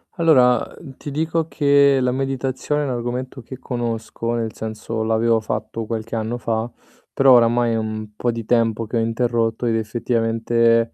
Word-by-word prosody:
Allora, 130 -8 +5 0.2
uhm, 135 -1 -11
ti 145 - -7
dico 160 +2 -1
che 140 -3 +4
la 125 0 +1
meditazione 135 +2 -2
è - - -1
un 135 - -2
argomento 125 +2 -4
che 130 +2 -10
conosco, 115 -1 -3
nel 115 -2 -2
senso 110 0 -4
l'avevo 115 +1 +2
fatto 110 +1 -4
qualche 115 0 -4
anno 115 +2 -2
fa, 115 0 -2 0.4
però 135 -1 +6
oramai 120 0 +4
è - - 0
un 110 -1 -4
po' 120 +1 0
di 115 0 -5
tempo 115 -1 +1
che 115 - -2
ho - - +2
interrotto 115 0 0
ed 115 - +1
effettivamente 115 +1 +1
115 Hz, 170 wpm, -21 LUFS, 115-130 Hz, 0.4 s, però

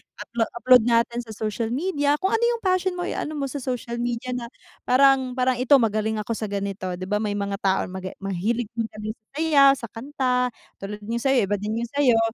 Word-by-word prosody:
uploa 230 -1 -2
upload 250 0 +6
natin 235 0 +2
sa 225 - -11
social 220 +2 -2
media 290 -1 +1
kung 380 +5 0
ano 450 - 0
yung 470 -1 +2
passion 370 -1 +1
mo, - - -1
eh, - - -3
ano 305 - -3
mo 280 -2 -2
sa 280 +1 -5
social 245 -2 -3
media 240 +1 -2
na 240 -1 -4 0.4
parang 265 0 +4
parang 255 0 +2
ito 255 +2 -3
magaling 220 -3 +1
ako 230 - -6
sa 215 - -3
ganito. 195 -2 -3
'Di 185 - -7
ba, 210 +1 0
may 210 -1 -2
mga 200 0 -3
tao 190 -1 +1
na - - -7
maga 190 0 -5
mahilig 205 +5 -1
din 230 -1 -1
kami 215 0 -4
sa 215 - -15
sayaw, 290 -3 +5
sa 250 -4 -7
kanta. 250 0 0 0.3
Tulad 205 +1 -7
yung 230 +3 -2
sa'yo 265 +1 +3
iba 205 - +1
din 215 +2 -2
yung 235 - -5
sayo 245 -5 +5
235 Hz, 225 wpm, -24 LUFS, 210-270 Hz, 0.4 s, upload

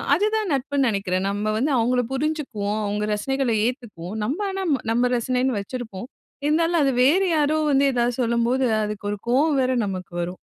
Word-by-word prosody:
அதுதான் 425 +3 0
நட்புன்னு 275 0 0
நினைக்கிறேன். 195 -3 -1
நம்ம 205 +1 -2
வந்து 275 +7 +1
அவங்கள 245 +2 +2
புரிஞ்சுக்குவோம். 265 -8 -2
அவுங்க 205 +1 -2
ரசனைகளை 270 +3 -1
ஏத்துக்குவோம். 220 - -6
நம்ப 280 - -2
ஆனா 385 0 -3 0.3
நம்ப 240 +2 +2
ரசனைன்னு 250 0 0
வச்சிருப்போம். 225 -1 -7 0.4
இருந்தாலும் 330 +3 +2
அது 275 - +3
வேறு 345 +9 +4
யாரோ 300 +1 +2
வந்து 275 0 +4
எதாவது 240 0 +1
சொல்லும்போது, 235 +2 +1 0.2
அதுக்கு 210 -1 -5
ஒரு 205 - -3
கோவம் 280 +5 +3
வேற 260 0 +2
நமக்கு 185 -3 -5
வரும். 180 +2 -4
250 Hz, 160 wpm, -23 LUFS, 210-285 Hz, 0.4 s, வேறு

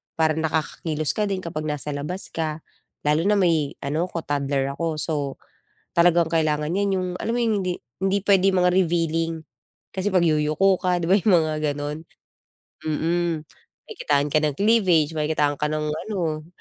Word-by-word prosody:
para 160 -1 +2
nakakakilos 155 -1 -1
ka 210 -1 0
din 190 -2 -3
kapag 155 -2 -4
nasa 150 -1 -3
labas 150 +7 -3
ka, 155 -1 -3 0.4
lalo 150 +2 +2
na 210 - +4
may 165 -6 +1
ano 155 +5 -1
ako 165 -2 -5
toddler 140 -1 0
ako, 165 0 -2
so 160 - -1 0.8
talagang 170 0 +5
kailangan 155 -1 +1
niyan 200 +2 +1
yung 185 0 -2
alam 230 - -2
mo - - 0
yung 220 -2 +1
hindi 180 -1 -2 0.2
hindi 195 +1 +2
pwede 195 -2 +4
mga 180 -1 +3
revealing 165 -2 0 0.5
kasi 190 +1 -1
'pag 180 -2 +4
yuyuko 155 +5 +3
ka, 180 -1 +1
'di - - -1
ba, 195 - +7
yung 205 -1 +3
mga 155 -1 -1 0.2
ganon. 145 +1 -4 0.9
Mm. 165 +1 0 0.4
Makikitaan 145 - 0
ka 155 - +4
ng 150 -2 0
cleavage, 190 -8 +3
makikitaan 150 -1 +1
ka 150 - +1
ng 155 0 -1 0.2
ano, 165 -7 -2
165 Hz, 165 wpm, -23 LUFS, 150-185 Hz, 0.9 s, ba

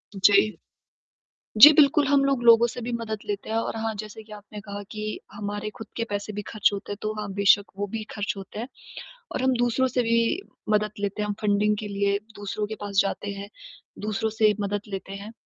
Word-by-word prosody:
जी। 205 +2 +4 1.0
जी 295 +5 +13
बिल्कुल, 290 0 +5
हम 275 0 +4
लोग 275 -3 +1
लोगों 235 0 +7
से 245 +1 -6
भी 240 +1 -4
मदद 225 -2 -3
लेते 205 0 -4
हैं 220 - 0
और 225 - -1
हाँ 225 0 -2
जैसे 215 +1 -10
कि 215 0 -16
आपने 210 0 -10
कहा 205 0 -7
कि 215 0 -4
हमारे 205 +1 -4
खुद 225 - -8
के 230 - 0
पैसे 205 +1 -3
भी 210 0 -4
ख़र्च 215 - +2
होते 200 0 -5
हैं 205 - -4
तो 215 0 -1
हाँ 210 - -5
बेशक़ 200 +1 +3
वो 205 - -1
भी 220 +2 -5
ख़र्च 205 -1 -1
होते 195 +1 -9
हैं। 235 +3 -4 0.6
और - - -2
हम 260 0 +3
दूसरों 245 +2 +2
से 250 0 0
भी 230 +6 +2 0.3
मदद 210 0 +2
लेते 200 +1 -2
हैं 210 - -1
हम 205 - -1
फंडिंग 210 0 +2
के 215 - -5
लिए 200 0 0 0.2
दूसरों 205 +1 -3
के 220 - -5
पास 200 -1 0
जाते 200 +1 -3
हैं, 200 0 -7 0.5
दूसरों 215 +1 -1
से 215 -1 +3
मदद 205 0 -1
लेते 195 -1 -6
हैं। 205 +2 -8
210 Hz, 215 wpm, -25 LUFS, 205-225 Hz, 1.0 s, जी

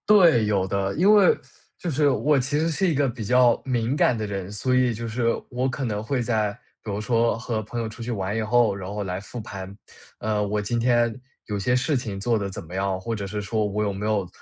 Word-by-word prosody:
对， 170 - +6
有 100 -3 +1
的。 100 0 -1
因 195 +6 +5
为， 205 -3 +6 0.4
就 175 - -4
是 145 -1 +3
我 145 +2 +2
其 140 +4 0
实 160 +1 +1
是 185 +4 +1
一 - - +1
个 140 0 +2
比 120 -2 -5
较 125 +2 +4
敏 125 0 0
感 125 -4 +3
的 110 - -2
人， 100 -2 -5
所 125 +5 0
以 125 -2 +3
就 115 +1 -5
是 115 +1 -1 0.2
我 130 +1 -1
可 130 +1 -3
能 105 -2 -2
会 130 +2 -1
在 110 -3 0 0.3
比 105 - -4
如 100 - -2
说 115 +1 +1
和 115 -1 -3
朋 120 +3 -5
友 115 - -2
出 110 +2 -9
去 120 - -4
玩 100 -2 -2
以 115 - 0
后， 115 -1 +3
然 95 0 -6
后 105 0 -3
来 90 -1 -3
复 105 +4 -8
盘。 95 -2 -8 0.4
呃， 105 -1 0
我 105 +1 -1
今 115 +3 -1
天 120 -1 +2 0.3
有 105 - -3
些 110 +5 +1
事 135 +4 +1
情 110 -6 -3
做 115 +3 +1
得 100 -2 -3
怎 95 - -4
么 85 - -12
样， 95 0 -1
或 115 +5 -3
者 100 -2 -4
是 105 +1 -4
说 110 +1 -1
我 105 +1 -1
有 100 -1 -1
没 100 +2 -4
有 105 -4 0
110 Hz, 270 characters per minute, -24 LUFS, 100-125 Hz, 0.4 s, 对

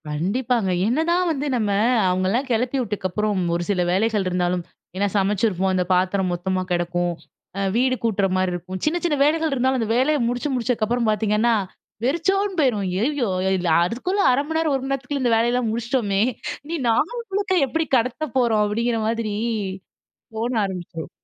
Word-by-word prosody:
கண்டிப்பாங்க. 205 - 0 0.2
என்னதான் 340 +8 +1
வந்து 290 -2 -2
நம்ம 215 -4 0 0.4
அவங்களலாம் 185 +9 0
கெளப்பி 245 +4 0
விட்டக்கப்புறம், 210 -2 -1
ஒரு 175 - -1
சில 190 -3 +1
வேலைகள் 210 +1 +1
இருந்தாலும், 180 0 0 0.3
ஏன்னா, 200 +2 +1
சமைச்சிருப்போம். 195 -1 +1
அந்த 185 -1 +2
பாத்திரம் 185 0 +1
மொத்தமா 185 +2 -1
கெடக்கும். 175 0 0 0.5
அ - - 0
வீடு 255 +2 +2
கூட்டுற 210 -4 +1
மாரி 185 -1 +1
இருக்கும். 185 +2 -5
சின்ன, 310 +3 +1
சின்ன 320 -4 +2
வேலைகள் 320 +1 +1
இருந்தாலும், 260 0 +1
அந்த 220 - -2
வேலைய 295 +4 +3
முடிச்சு, 245 +4 -2
முடிச்சக்கப்புறம் 235 -1 0
பார்த்தீங்கன்னா, 215 +2 +2 0.5
வெறிச்சோன்னு 380 +8 0
போயிரும். 245 -9 +2
"ஐய்யயோ! 235 +8 0 0.3
இதுல 180 -2 0
அதுக்குள்ள 360 - -1
1/2 255 +2 +2
மணி 320 0 -1
நேரம், 320 -3 +1
1 265 - -2
மணி 270 - -4
நேரத்துக்குள்ள 275 +1 -2
இந்த 240 -2 +3
வேலையெல்லாம் 240 +1 +1
முடிச்சிட்டோமே. 230 -4 0 0.4
இனி 335 +3 -3
நாள் 230 - +2 0.2
முழுக்க 395 -1 0
எப்பிடி 320 +4 -1
கடத்தப் 255 +3 -2
போறோம்?" 230 -4 +3
அப்பிடிங்கிற 230 +3 0
மாதிரி 225 -2 -1 1.0
தோண 230 +3 -1
ஆரம்பிச்சுரும். 175 -4 -6
230 Hz, 155 wpm, -22 LUFS, 190-265 Hz, 1.0 s, வேலைய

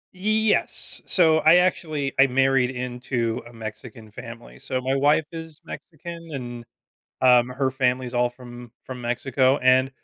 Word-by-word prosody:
Y - - -17
y 205 +3 -1 0.2
yes, - - -3
so 160 -4 +4
I 155 +2 +6
actually 155 -6 0
I 135 - +7
married 135 -1 +2
into 125 -2 -3
a 120 - -15
Mexican 110 0 -9
family, - - -11
so 130 - -3
my 130 +1 -1
wife 145 +3 +3
is 160 -2 -9
Mexican, 170 +1 -9
and, 120 -3 -7 0.6
um, 125 -1 +5
her 130 +1 -1
family's 125 -1 -1
all 120 0 +2
from 120 -1 -12
from 130 -1 -8
Mexico, 130 +3 +1
and 130 +1 +4
130 Hz, 155 wpm, -23 LUFS, 120-145 Hz, 0.6 s, I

